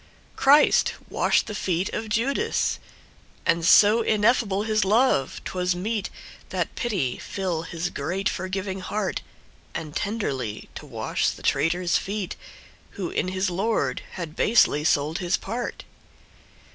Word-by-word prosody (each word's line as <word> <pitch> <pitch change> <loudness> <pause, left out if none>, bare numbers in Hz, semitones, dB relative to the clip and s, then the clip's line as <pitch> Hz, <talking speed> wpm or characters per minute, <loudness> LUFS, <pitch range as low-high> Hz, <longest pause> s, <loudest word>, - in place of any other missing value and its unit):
Christ 290 +3 +5 0.2
washed - - +2
the - - -6
feet 185 -3 -1
of 220 0 -4
Judas! 235 +6 0 0.7
And 165 -1 +2
so 210 +6 +6
ineffable 215 -2 +2
his 215 -1 +1
love 210 - +2
'twas 180 -1 -1
meet, 210 +3 -2 0.4
That - - -2
pity 190 - -1
fill 185 -5 -3
his 165 +1 -4
great 180 +7 -2
forgiving 190 +1 -3
heart, 195 0 -2 0.5
And 155 -2 -5
tenderly 140 - -3
to - - -9
wash - - -1
the - - -8
traitor's 170 +5 +2
feet, 200 -1 -4 0.6
Who 185 -4 -3
in - - -1
his 185 0 -1
Lord 185 - 0
had 170 -4 -6
basely 200 -10 +4
sold 155 +1 +1
his 175 0 +1
part. 235 +4 -5
190 Hz, 130 wpm, -25 LUFS, 170-215 Hz, 0.7 s, so